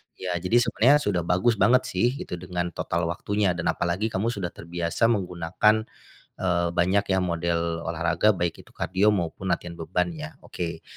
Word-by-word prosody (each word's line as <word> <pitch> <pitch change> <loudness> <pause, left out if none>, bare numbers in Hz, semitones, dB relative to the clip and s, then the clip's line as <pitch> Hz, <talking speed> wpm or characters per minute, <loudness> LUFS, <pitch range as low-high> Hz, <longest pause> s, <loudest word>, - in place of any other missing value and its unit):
Ya 90 -1 -4
jadi 115 +8 +3
sebenarnya 120 +4 +4
sudah 100 -4 +1
bagus 100 +5 +2
banget 125 +1 +5
sih 120 +3 0
itu 90 - -6
dengan 90 0 -3
total 85 +1 -2
waktunya 100 +2 0
dan 85 -1 -3
apalagi 90 +5 0
kamu 115 +1 -1
sudah 100 -6 -3
terbiasa 85 +6 0
menggunakan, 95 +2 +1 0.5
eee, 85 -2 0
banyak 95 +3 +2
ya 95 -1 +2
model 85 -1 0 0.3
olahraga 85 +5 +2
baik 85 -2 -2
itu - - -21
kardio, 95 +3 +1
maupun 90 +1 -3
latihan 85 -2 -2
beban 90 +2 -1
ya, 80 -1 -8
oke. 85 -2 -5
90 Hz, 165 wpm, -25 LUFS, 85-105 Hz, 0.5 s, banget